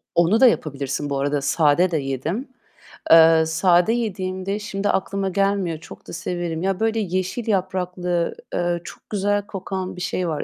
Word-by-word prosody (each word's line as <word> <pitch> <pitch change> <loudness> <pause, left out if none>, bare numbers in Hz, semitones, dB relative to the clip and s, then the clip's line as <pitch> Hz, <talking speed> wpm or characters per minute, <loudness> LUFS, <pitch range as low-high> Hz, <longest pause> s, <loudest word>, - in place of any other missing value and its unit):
Onla 175 +7 +4
da 260 - +8
yapabilirsin 145 - -1
bu 140 -1 -1
arada, 145 0 0
sade 155 +5 +3
de 160 - +1
yedim. 145 - -3 0.6
Eee, 165 0 +8
sade 175 +5 +3
yediğimde 195 -3 -2
şimdi 205 -1 -3
aklıma 195 0 -1
gelmiyor. 195 -3 0
Çok 165 - -13
da - - -8
severim. 170 -1 -3
Ya, 190 0 -1
böyle 225 0 +1
yeşil 185 +4 -2
yapraklı, 180 -3 -1 0.2
eee, 175 -1 0
çok - - -12
güzel 205 0 0
kokan 190 -1 -5
bir 180 - -8
şey 180 0 -2
var. 155 -2 -2
180 Hz, 160 wpm, -22 LUFS, 165-195 Hz, 0.6 s, da